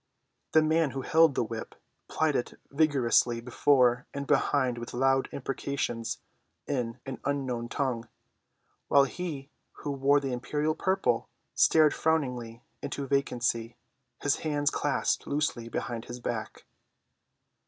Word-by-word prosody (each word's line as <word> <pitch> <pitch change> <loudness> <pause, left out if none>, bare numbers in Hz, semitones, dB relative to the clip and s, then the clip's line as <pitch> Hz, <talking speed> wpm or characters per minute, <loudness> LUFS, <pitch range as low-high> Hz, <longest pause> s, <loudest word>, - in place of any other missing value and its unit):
The 160 - +6
man 160 0 +2
who 135 - -3
held 160 -3 +4
the - - +2
whip 115 0 -6 0.3
plied 155 -2 +1
it 120 - -3
vigorously 135 -5 +3
before 125 0 +3
and 140 0 -3
behind 135 -3 +2
with 120 - -7
loud 135 +1 +2
imprecations 135 -3 -3 0.4
in 120 -5 -2
an 135 -1 -6
unknown 130 -4 -2
tongue, 120 -4 -2 0.8
while 140 - +6
he 145 -1 -5 0.2
who 145 - -5
wore 140 +1 +3
the 135 -2 -3
imperial 150 +5 -1
purple 165 -9 0 0.2
stared 155 -2 +5
frowningly 125 -7 -1 0.2
into 140 0 -4
vacancy, 120 -4 0 0.4
his 145 - +1
hands 145 -2 0
clasped 145 -2 0
loosely 140 -5 -1
behind 115 -1 -4
his 120 +1 -7
back. 120 -2 -5
135 Hz, 125 wpm, -29 LUFS, 120-145 Hz, 0.8 s, The